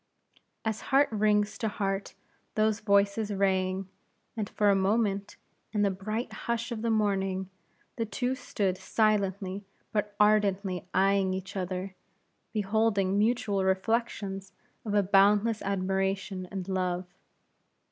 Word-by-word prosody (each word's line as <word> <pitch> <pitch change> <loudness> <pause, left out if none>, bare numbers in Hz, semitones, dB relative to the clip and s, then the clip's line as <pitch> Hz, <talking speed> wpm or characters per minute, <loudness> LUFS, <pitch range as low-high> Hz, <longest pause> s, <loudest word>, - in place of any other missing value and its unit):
As 220 -1 -1
heart 280 +1 +5
rings 210 -1 +2
to 225 - 0
heart 195 -2 -2 0.4
those 215 0 +2
voices 200 0 +2
rang, 190 -1 +1 0.5
and 215 -3 -3
for 205 -1 +3
a - - +4
moment, 200 0 +1 0.4
in 210 -1 +2
the 200 - +3
bright 215 +5 -4
hush 235 +1 -3
of 225 -2 -3
the 230 - 0
morning, 195 -3 0 0.5
the 230 - 0
two 245 +4 -1
stood 200 -7 -2
silently 200 -2 0 0.3
but 210 -1 -1
ardently 200 -3 +2
eying 195 0 +3
each 190 +2 -6
other, 185 0 -3 0.6
beholding 205 -2 +1
mutual 215 -3 +1
reflections 195 -1 -1 0.3
of 210 -1 -1
a 205 - +4
boundless 205 +3 +4
admiration 190 -1 -1
and 190 -2 -5
love. 185 -1 -1
200 Hz, 125 wpm, -29 LUFS, 190-215 Hz, 0.6 s, heart